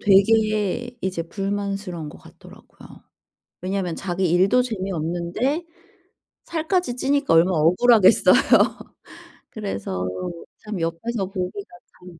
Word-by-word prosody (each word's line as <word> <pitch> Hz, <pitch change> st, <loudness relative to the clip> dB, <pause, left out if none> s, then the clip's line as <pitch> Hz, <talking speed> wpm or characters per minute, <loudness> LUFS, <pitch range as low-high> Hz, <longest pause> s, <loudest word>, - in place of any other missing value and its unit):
되게 215 Hz, +3 st, +2 dB
이제 185 Hz, -3 st, -2 dB
불만스러운 195 Hz, -2 st, -4 dB
것 -, -, -12 dB
같더라고요. -, -, -16 dB, 0.6 s
왜냐면 185 Hz, -2 st, -2 dB
자기 185 Hz, -1 st, -2 dB
일도 190 Hz, +8 st, +4 dB
재미없는데 190 Hz, -, -2 dB, 0.8 s
살까지 330 Hz, -4 st, -1 dB
찌니까 280 Hz, -, +1 dB
얼마나 170 Hz, +2 st, +4 dB
억울하겠어요. 185 Hz, +6 st, +5 dB, 1.2 s
그래서 100 Hz, -, -4 dB, 0.5 s
참 210 Hz, -3 st, -6 dB
옆에서 190 Hz, +6 st, -2 dB
보기가 195 Hz, +3 st, -6 dB, 0.2 s
참 180 Hz, -2 st, -14 dB
195 Hz, 260 characters per minute, -22 LUFS, 175-225 Hz, 1.2 s, 억울하겠어요